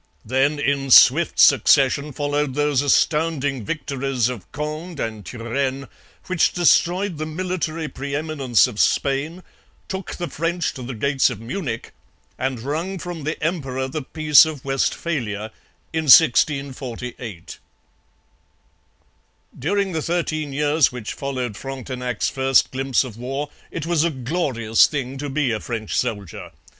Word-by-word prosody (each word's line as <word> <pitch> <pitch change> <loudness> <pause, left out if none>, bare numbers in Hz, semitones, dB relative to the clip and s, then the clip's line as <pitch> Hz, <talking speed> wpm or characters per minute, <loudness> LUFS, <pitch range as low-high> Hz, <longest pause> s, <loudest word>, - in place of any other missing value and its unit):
Then 135 +5 +1
in 140 -1 -1
swift 145 +6 +6
succession 140 +2 +5
followed 145 -1 -1
those 145 -2 +2
astounding 145 -2 +1
victories 135 -3 -2
of 120 -7 -8
Conde 155 +3 -5
and 110 -2 -4
Turenne 130 +4 -3 0.4
which 185 -3 +1
destroyed 175 0 +2
the 155 - -3
military 165 -1 -3
pre 140 -1 -5
eminence 145 -6 +2
of 120 -5 -6
Spain, 145 +6 0 0.4
took 190 0 -5
the 175 - -4
French 165 +1 -2
to 130 - -9
the 125 0 -6
gates 140 +4 +2
of - - -6
Munich, 120 - -5 0.5
and 130 -3 -2
wrung 160 +9 -3
from 175 -4 -6
the 155 - -3
emperor 135 -6 -2
the 150 +4 -4
Peace 155 +1 +5
of 155 -5 -5
Westphalia 130 -6 -2 0.4
(1648). 130 - +2 2.0
During 200 +7 0
the 160 -2 -2
thirteen 155 -3 -2
years 150 +1 +2
which 125 -4 -6
followed 130 -5 -4
Frontenac's 125 -2 -4
first 135 -1 +2
glimpse 135 -1 +1
of 120 -5 -9
war 135 +4 -4 0.2
it 165 - -5
was 165 -2 +2
a 170 - +2
glorious 130 -5 +1
thing 135 -2 -4
to 145 0 -4
be 140 -2 0
a 110 - -1
French 110 -2 -4
soldier. 100 -8 -3
140 Hz, 130 wpm, -22 LUFS, 125-155 Hz, 2.0 s, swift